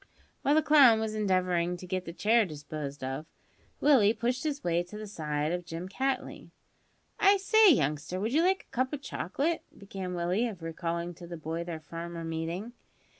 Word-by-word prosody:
While 285 - +3
the 315 - +4
clown 270 -7 +7
was 220 -1 -2
endeavouring 185 -4 +1
to 180 - -9
get 185 0 -3
the 165 - -5
chair 220 +6 +3
disposed 145 -4 -6
of, 135 +4 -4 0.5
Willie 235 -7 +5
pushed 245 +3 -1
his 300 -2 -2
way 170 0 +1
to 180 +4 -9
the 215 - -6
side 150 -6 -2
of 180 0 -2
Jim 170 +1 -6
Cattley. 265 +5 -3 0.7
"I 400 -1 +6
say, 425 +1 +6
youngster, 155 - 0
would 220 +5 -2
you 315 - +4
like 375 +2 +2
a - - -42
cup 255 +1 +1
o' - - -5
chocolate?" 280 - -2 0.2
began 190 -2 -6
Willie 175 +3 0
by 240 - +2
way - - -1
of 185 -6 -10
recalling 170 +1 -3
to 175 +1 -11
the 170 0 -7
boy 160 +2 -4
their 170 -2 -6
former 170 +2 -7
meeting. 165 +7 -4
185 Hz, 195 wpm, -29 LUFS, 165-245 Hz, 0.7 s, clown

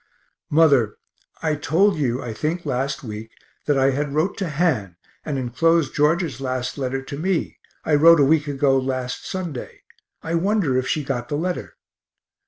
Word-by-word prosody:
Mother, 140 -8 +4 0.5
I 160 -1 +1
told 165 +7 +2
you, 130 -3 -1
I 120 -2 -5
think 160 +10 -3
last 135 +1 -2
week, 110 -1 -7 0.4
that 145 -2 +3
I 135 0 +4
had 145 +1 -2
wrote 160 +6 +1
to 190 -4 -2
Han, 140 - 0 0.3
and 145 -3 -3
enclosed 155 +5 +1
George's 150 -3 +1
last 130 -1 -2
letter 135 -1 -3
to 140 +1 -7
me 180 0 -1 0.3
I 155 - 0
wrote 165 +2 +7
a - - +6
week 155 +1 +2
ago 135 -1 +2
last 130 -1 -3
Sunday 175 -9 -6 0.4
I 165 - -3
wonder 175 -5 +1
if 130 0 0
she 155 - 0
got 125 -3 -3
the 145 - -1
letter. 180 +3 -3
145 Hz, 170 wpm, -22 LUFS, 130-165 Hz, 0.5 s, wrote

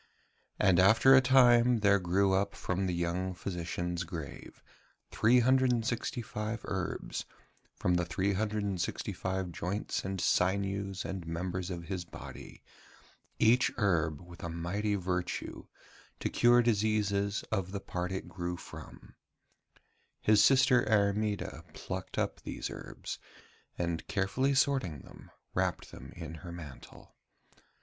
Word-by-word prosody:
And 95 -2 +4
after 115 +8 +6
a 130 - +8
time 125 -3 +5
there 100 -1 +5
grew 95 +2 +2
up 100 +1 0
from 95 +1 -2
the 90 - -1
young 90 +2 -2
physician's 90 -1 -3
grave 80 -3 -8 0.5
365 115 -2 +1
herbs 95 -1 -3 0.5
from 90 - 0
the 90 0 +1
365 95 -1 -2
joints 95 +5 -3
and 95 0 -3
sinews 95 +2 0
and 95 -3 -5
members 90 +2 -3
of 85 -2 -5
his 90 0 -4
body, 85 - -11 0.7
each 125 +3 +4
herb 80 -8 +1
with 90 0 -13
mighty 85 +5 -2
virtue 90 -2 -3 0.5
to - - -1
cure 120 0 +5
diseases 105 -2 +1
of 95 -1 -1
the 100 - -3
part 90 -1 -4
it 95 - -4
grew 90 -1 -4
from. - - -11 1.1
His 105 -1 +5
sister 130 -2 +5
Airmeda 105 0 0
plucked - - -6
up - - -1
these - - -5
herbs, - - -7 0.6
and 85 -1 -2
carefully 130 +8 +1
sorting 130 - +1
them, - - -14 0.2
wrapped - - -1
them - - -10
up - - -16
in 80 -2 -6
her 85 - -8
mantle. 80 -6 -11
95 Hz, 120 wpm, -31 LUFS, 90-110 Hz, 1.1 s, a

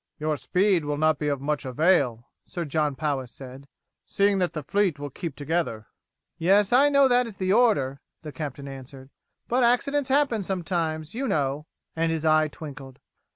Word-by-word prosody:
"Your 155 0 -1
speed 180 +3 +1
will 145 0 -2
not 155 -1 +2
be 150 - -2
of 140 -2 0
much 150 +1 -2
avail," 130 -4 +1 0.2
Sir 175 -2 -5
John 150 -1 0
Powis 135 -4 -2
said, 135 +1 -11 0.4
"seeing 200 0 +1
that 180 -1 0
the 155 - -5
fleet 190 0 +1
will 145 0 -6
keep 165 0 -6
together." 145 -7 -2 0.5
"Yes, 195 +5 +3
I 275 +4 +6
know 280 -1 +5
that 245 -1 +3
is 215 - -10
the 185 0 +1
order," 170 - +2 0.2
the 155 - -7
captain 140 0 -6
answered; 135 0 -11 0.4
"but 250 +1 +2
accidents 270 +3 +1
happen 270 -5 +2
sometimes, 170 -4 -3
you 265 +4 -2
know" 145 - -1 0.3
and 165 0 0
his 160 -1 -2
eye 155 0 +4
twinkled. 140 -3 -10
155 Hz, 175 wpm, -25 LUFS, 140-195 Hz, 0.5 s, I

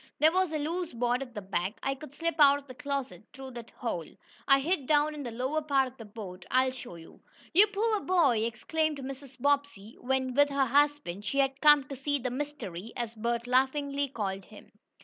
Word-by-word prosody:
There 310 +1 +5
was 370 -1 +1
a 310 - -1
loose 330 +3 -3
board 245 +2 0
at 250 -3 -8
the 210 - -5
back. 190 +2 -2
I 270 - +1
could 285 0 -11
slip 335 +2 -1
out 285 -1 +7
of 285 - -11
the 260 - -10
closet 265 -9 -4
through 265 -2 -9
that 235 -2 -9
hole. 180 -10 -4 0.4
I 275 -1 +6
hid 290 -1 -1
down 300 0 +3
in 300 - -6
the 250 - -4
lower 260 +7 -1
part 275 -3 +2
of 255 - -12
the 225 - -9
boat. 200 -4 -9
I'll 260 0 +3
show 245 -7 -9
you." 165 -1 -14 0.3
"You 400 +6 +7
poor 425 +1 0
boy!" 325 - +3
exclaimed 310 +6 -1
Mrs. 270 -1 -8
Bobbsey 280 -6 0
when, 260 0 -1
with 285 +2 +4
her 275 -1 +2
husband, 285 -7 +1
she 210 +7 -3
had 270 0 +1
come 295 -2 +7
to 275 +1 -8
see 285 +2 -1
the 255 -2 -3
"mystery," 250 -9 -5
as 235 -2 -3
Bert 235 +1 -2
laughingly 280 +3 +1
called 195 -7 -4
him. 215 - -15
270 Hz, 210 wpm, -29 LUFS, 235-290 Hz, 0.4 s, out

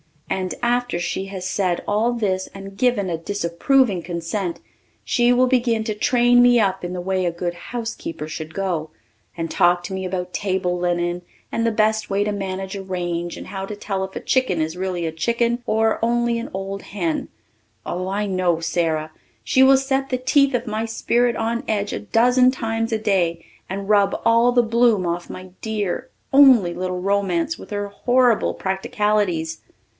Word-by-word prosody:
And 185 -1 -2
after 245 -4 +1
she 175 +2 -2
has 190 -2 -5
said 185 -3 0
all 220 +4 +1
this 190 -5 -1
and 195 0 -9
given 240 -3 +1
a 165 - -1
disapproving 200 +5 +1
consent 170 +2 -3 0.4
she 240 0 +2
will 250 +1 +4
begin 240 -3 +1
to 220 -1 -2
train 245 +3 +4
me 245 -1 +6
up 190 -3 0
in 175 0 -4
the 180 - -4
way 185 +1 -1
a 175 - +1
good 175 +1 -3
housekeeper 225 -5 -6
should 160 0 -7
go, 175 -5 -2 0.5
and 165 -1 -3
talk 175 0 +3
to 190 - -6
me 190 0 -3
about 180 -1 -4
table 185 -2 -1
linen 175 0 -1 0.3
and 230 0 0
the - - +2
best 220 0 +1
way 200 +1 +1
to 210 - -1
manage 195 -1 -4
a 195 - -4
range 175 -2 -3
and - - -9
how 195 0 -5
to 210 - -5
tell 195 -2 -3
if 190 0 -7
a - - -2
chicken 255 -10 +1
is 160 +1 -1
really 180 -2 -2
a 160 - -2
chicken 235 +8 0
or 220 0 +2
only 235 0 +1
an 230 - -6
old 195 +1 -5
hen. 175 -6 -2 0.6
Oh, 180 +1 -3
I 200 +2 -1
know 185 -4 +1
Sara! 160 -2 -1 0.3
She 260 - +3
will 265 0 +7
set 270 0 -1
the 255 - 0
teeth 270 +1 +3
of 245 0 -1
my 220 0 -2
spirit 235 +1 +1
on 230 +1 -1
edge 205 -2 -1
a - - -2
dozen 250 - +4
times 225 -3 -2
a 220 - +1
day 180 -6 0 0.2
and 195 +1 -4
rub 205 -2 +3
all 230 +1 +5
the 245 -1 +4
bloom 230 -4 +3
off 175 0 -3
my 185 0 -8
dear, 220 +3 -3 0.2
only, 255 -11 +7
little 180 0 -3
romance 195 - 0
with - - -11
her 205 -1 -3
horrible 245 +2 +2
practicalities. 190 -4 -1
200 Hz, 185 wpm, -22 LUFS, 180-235 Hz, 0.6 s, will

